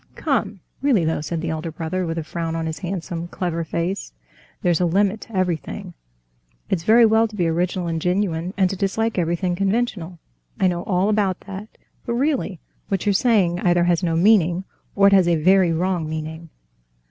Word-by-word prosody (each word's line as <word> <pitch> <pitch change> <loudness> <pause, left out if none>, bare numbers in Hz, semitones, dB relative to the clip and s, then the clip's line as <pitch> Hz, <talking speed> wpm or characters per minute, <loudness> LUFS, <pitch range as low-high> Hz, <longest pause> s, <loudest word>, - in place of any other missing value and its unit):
"Come, 210 - -1 0.2
really 255 - +3
though," 160 -1 0
said 160 +1 -3
the 165 -1 -2
elder 160 +1 -4
brother, 170 +3 -3
with 165 0 -3
a 165 - -2
frown 165 +1 -4
on 165 0 -2
his 160 0 -4
handsome, 175 -2 -4
clever 170 -2 -3
face, 170 - -3 0.5
"there's 175 -1 +2
a - - +3
limit 200 +4 +1
to 220 - -7
everything. 180 -4 -2 0.8
It's 185 - +1
very 225 +6 +6
well 220 +1 +4
to 215 - -12
be 175 -4 +1
original 175 +2 -1
and 165 -1 -2
genuine, 180 -1 -1
and 190 -2 +4
to - - -3
dislike 205 +2 -1
everything 175 +1 0
conventional—I 180 - -3
know 175 -1 -2
all 185 0 +1
about 205 -3 +1
that; 200 +2 -9 0.3
but 235 - 0
really, 255 - -1 0.3
what 195 -1 -2
you're 205 - +3
saying 195 -6 +2
either 175 -1 +3
has 175 -1 +2
no 165 -3 0
meaning, 180 -1 +3 0.3
or 200 - +4
it 200 - +6
has 190 -3 +5
a 170 - +3
very 185 +2 +4
wrong 170 -1 -1
meaning. 160 +1 -6
180 Hz, 185 wpm, -22 LUFS, 165-200 Hz, 0.8 s, very